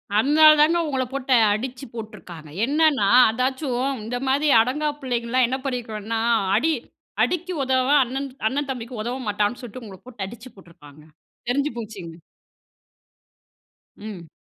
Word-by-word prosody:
அதனால 300 +8 +6
தாங்க, 330 +3 +4
உங்கள 265 -3 -1
போட்டு 270 -1 -1 0.2
அடிச்சு 250 +4 -5
போட்ருக்காங்க. 180 -8 -9 0.2
என்னன்னா, 290 -5 +2 0.2
அதாச்சும் 255 +2 -1
இந்த 240 +3 -3
மாரி 280 +3 +2
அடங்கா 295 +6 -1
பிள்ளைங்கல்லாம் 245 -1 0
என்ன 260 +2 -2
பண்ணிருக்கனுன்னா, 225 -4 -3 0.4
அடி 320 - +2 0.5
அடிக்கு 360 +1 -1
உதவா 260 +1 +2
அண்ணன் 265 +3 -4 0.2
அண்ண 265 +5 -1
தம்பிக்கு 245 -2 -5
உதவ 240 +3 -3
மாட்டான்னு 210 +3 -1
சொல்ட்டு, 245 +1 -8
உங்கள 195 -2 -10
போட்டு 240 -6 -6
அடிச்சு 235 +4 -11
போட்ருப்பாங்க. 160 -6 -17 0.5
தெரிஞ்சு 280 +4 0
போச்சுங்க. 200 -8 -8 1.8
ம். 205 -6 -9
245 Hz, 125 wpm, -23 LUFS, 215-270 Hz, 1.8 s, அதனால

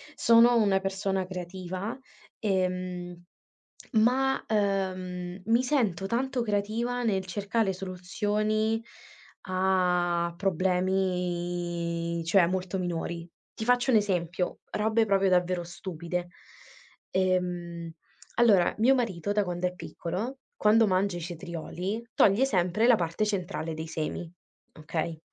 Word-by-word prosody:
sono 235 +1 +6
una 200 -4 +3
persona 195 0 -1
creativa, 185 +3 -5 0.4
ehm, 180 -3 -2 0.7
ma 255 +4 +3
ehm, 185 -3 -1
mi 230 +3 +3
sento 220 - +1
tanto 250 +3 0
creativa 230 +3 -1
nel 195 -5 0
cercare 200 +2 0
soluzioni 210 +4 -1 0.6
a 180 -2 +1
problemi, 175 -2 -1
cioè 170 +1 +5
molto 185 +1 -2
minori. 170 -1 -3 0.2
Ti 220 - -5
faccio 245 +1 +3
un 230 - +6
esempio, 180 -3 -1
robe 220 +1 +2
proprio 195 -2 +3
davvero 180 -1 +2
stupide. 175 0 -5 0.8
Ehm, 180 -2 -1 0.4
allora 210 -7 +5
mio 255 +5 +5
marito 205 -7 -1
da 205 0 +2
quando 180 -1 -1
è 180 - -6
piccolo, 200 +10 -5 0.2
quando 220 +1 +4
mangia 185 -1 +1
i - - -6
cetrioli, 175 +6 -5
toglie 205 +7 +5
sempre 190 -1 +2
la 245 - +7
parte 170 +2 -1
centrale 185 -5 -2
dei 160 +1 -5
semi, 160 +1 -4 0.4
okay? 160 +1 -4
185 Hz, 110 wpm, -28 LUFS, 175-215 Hz, 0.8 s, la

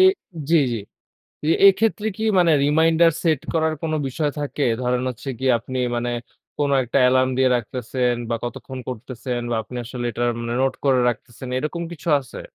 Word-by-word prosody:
এ - - +8 0.5
জি, 170 - +6 0.2
জি। - - -1 0.7
এ - - +1 0.2
এক্ষেত্রে 210 +2 +2
কি 220 - -5 0.2
মানে 170 -2 +5
রিমাইন্ডার 160 +3 +4
সেট 160 -5 +2
করার 160 -1 +1
কোনো 160 -1 -1
বিষয় 145 +3 -1
থাকে? 145 0 -3 0.2
ধরেন 125 0 0
হচ্ছে 125 +3 -8
গিয়ে 130 0 +2
আপনি 130 +3 -5 0.2
মানে 120 +1 -1 0.5
কোন 145 -1 0
একটা 125 - -3
অ্যালার্ম 130 +1 +4
দিয়ে 130 -1 +4
রাখতেছেন 125 +1 -1 0.2
বা 115 - +1
কতক্ষণ 130 +2 -6
করতেছেন 125 0 -4
বা - - +1
আপনি 115 +3 -9
আসলে 125 +1 -6
এটা 120 +1 -4 0.2
মানে 115 0 -3
নোট 135 - +1
করে 130 -2 +4
রাখতেছেন 120 +2 -5
এরকম 155 +5 -3
কিছু 170 +1 -8
আছে? 130 - -10
130 Hz, 175 wpm, -22 LUFS, 125-160 Hz, 0.7 s, এ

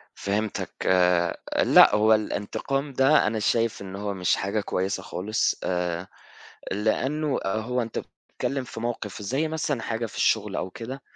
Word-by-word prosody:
فهِمتك، 105 +1 -2 0.9
لأ - - +7
هو 110 +1 +5
الانتقام 135 +6 -2
ده 135 -1 +4
أنا 110 +1 -1
شايف 115 0 +1
إن 95 -1 -7
هو 100 0 -3
مش 90 -2 +1
حاجة 100 +2 -1
كويسة 95 -1 -2
خالص 105 +5 0
آآ، 90 0 -2 0.6
لأنه 130 +9 0
هو 110 +5 -1
أنت 115 - -3
بتتكلّم 135 +2 -5
في 120 - -8
موقِف 110 -3 -4
زي 135 +10 -1
مثلًا 155 -5 -2
حاجة 115 0 -2
في 110 - -9
الشغل - - +1
أو 95 - -2
كده 125 +7 -7
110 Hz, 145 wpm, -26 LUFS, 100-130 Hz, 0.9 s, لأ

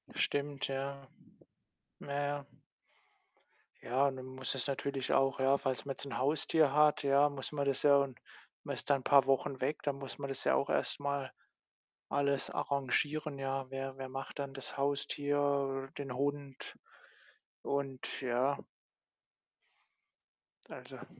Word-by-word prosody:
Stimmt, 145 -1 0
ja. 135 0 -4 0.9
Ja, - - -9 0.2
ja. 145 0 -2 1.4
Ja, 130 +4 +2
und 135 - -1
dann 130 - -7
muss 130 0 -4
es 135 - -2
natürlich 140 -1 -2
auch 135 -1 +3
ja, 135 +1 +4
falls 130 -4 -2
man 140 - -2
jetzt 140 - -8
'n 135 -4 -4
Haustier 150 +1 +3
hat, 150 0 +5
ja, 140 +1 +5
muss 140 -1 -6
man 140 -1 -1
das 140 -1 0
ja 145 -1 +7
und 140 -4 0 0.4
man - - -3
ist - - -7
da 140 -1 +4
paar 135 +1 +6
Wochen 135 0 +1
weg, 145 +4 0
dann 145 -2 -1
muss 135 -1 -6
man 140 - -4
das 135 - -4
ja - - +4
auch 140 - +1
erst - - 0
mal 140 -2 -2 0.8
alles 140 -1 +1
arrangieren, 145 +2 0
ja. 135 0 -2
Wer 135 0 -4
wer 135 -1 -5
macht 135 +2 -6
dann 140 -1 -3
das 135 +1 -8
Haustier, 140 -1 0
den 135 -3 -4
Hund 140 0 -3 0.9
und 135 -2 -3
ja. 130 +2 +1 2.1
Also - - -9
140 Hz, 145 wpm, -34 LUFS, 135-140 Hz, 2.1 s, ja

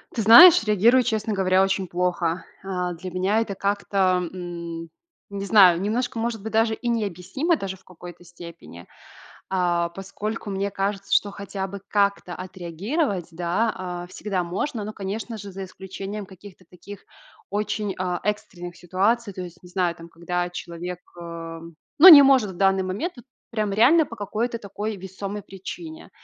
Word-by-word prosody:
Ты 225 - 0
знаешь, 235 - +10
реагирую, 220 +4 +4
честно 220 -2 -1
говоря, 190 -1 +3
очень 195 -1 0
плохо. 175 0 -1 0.2
А, 180 -2 -3
для 180 +2 -8
меня 190 +5 +1
это 215 -3 -3
как-то, 195 -2 0
м, 170 -2 -7 0.4
не 200 0 -5
знаю, 190 -5 +6
немножко, 235 +5 -2
может 225 -1 -2
быть, 220 +2 -6
даже 225 0 +2
и 240 - -6
необъяснимо 220 - -1
даже 190 -5 -5
в 190 - -26
какой-то 175 -1 -12
степени, 170 - -12 0.6
а, 175 -2 0
поскольку 205 +4 -6
мне 195 +1 -2
кажется, 195 0 -3
что 205 - +3
хотя 195 -1 -5
бы 200 +1 -8
как-то 200 -3 0
отреагировать, 185 - -3
да, 180 +7 -1
а, 180 -1 -5
всегда 190 0 -3
можно, 205 +7 -3
но, 210 +1 -5
конечно 215 +3 -5
же, 200 -1 -9
за 195 +1 -7
исключением 195 +2 -7
каких-то 190 0 -15
таких 190 +3 -12 0.4
очень, 205 0 -2
а, 180 -1 -2
экстренных 175 -4 -4
ситуаций, 200 +6 0
то 185 - -6
есть, 175 -2 -11
не 180 - -13
знаю, 180 -1 0
там 165 0 -12
когда 175 +1 -3
человек, 175 0 -6 0.2
э, 165 -1 -7 0.4
ну 365 - +12
не 300 -5 +12
может 265 -7 +4
в 185 - -10
данный 195 0 +3
момент 195 - -3
вот 245 - -13 0.3
прям 215 -3 -1
реально 270 +11 +5
по 230 - -10
какой-то 225 +4 -3
такой 210 0 -5
весомой 195 +2 -6
причине. 315 - -9
195 Hz, 160 wpm, -24 LUFS, 180-215 Hz, 0.6 s, ну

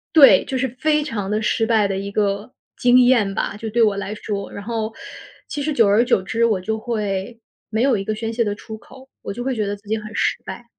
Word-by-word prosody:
对， 285 -3 +8
就 265 - -3
是 260 +1 0
非 300 -1 +2
常 210 -8 -4
地 215 +1 0
失 225 +1 +1
败 220 -3 +3
的 195 -1 -2
一 200 +1 -5
个 205 +2 -1 0.3
经 245 +1 +5
验 240 -6 +4
吧， 210 - -2
就 220 0 -5
对 235 +2 +1
我 210 -3 +4
来 200 +1 -4
说。 205 -1 -5
然 200 - -7
后， 225 0 -3 0.5
其 290 - -4
实 305 - -1
久 230 -7 +4
而 210 +4 +4
久 240 -6 +2
之 230 +5 -1
我 215 -5 +2
就 220 +4 -2
会 215 -1 -3 0.3
没 220 +1 -1
有 265 -4 +3
一 195 - -2
个 215 - -2
宣 225 +1 -4
泄 235 0 +1
的 205 -1 -1
出 220 +1 -9
口， 265 +4 -16
我 - - -5
就 240 - -6
会 260 -1 -1
觉 215 -2 -1
得 205 +1 -2
自 205 0 -21
己 220 - 0
很 215 -1 -8
失 - - +1
败。 240 - -8
220 Hz, 275 characters per minute, -21 LUFS, 205-240 Hz, 0.5 s, 对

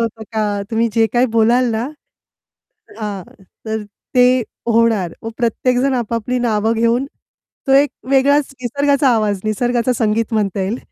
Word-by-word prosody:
होतं 225 -1 -3
का 210 -2 -1
तुम्ही 230 +1 +1
जे 225 -1 +4
काय 245 +1 +3
बोलाल 235 +2 +3
ना 225 +2 -1 1.2
हां. 205 -3 -4 0.4
तर 220 0 -2 0.3
ते 250 0 +5 0.3
होणार. 225 -6 +2
मग 225 - -5
प्रत्येक 245 +1 0
जण 275 0 +1
आपापली 235 +1 -2
नावं 220 -2 +1
घेऊन 235 +3 +1 0.6
तो 270 - +4
एक 280 +1 +4 0.2
वेगळाच 275 +1 +3
निसर्गाचा 280 +2 +1
आवाज, 210 -3 0
निसर्गाचं 240 +3 0
संगीत 225 0 0
म्हणता 200 -3 0
येईल. 195 +5 -2
230 Hz, 145 wpm, -18 LUFS, 220-250 Hz, 1.2 s, ते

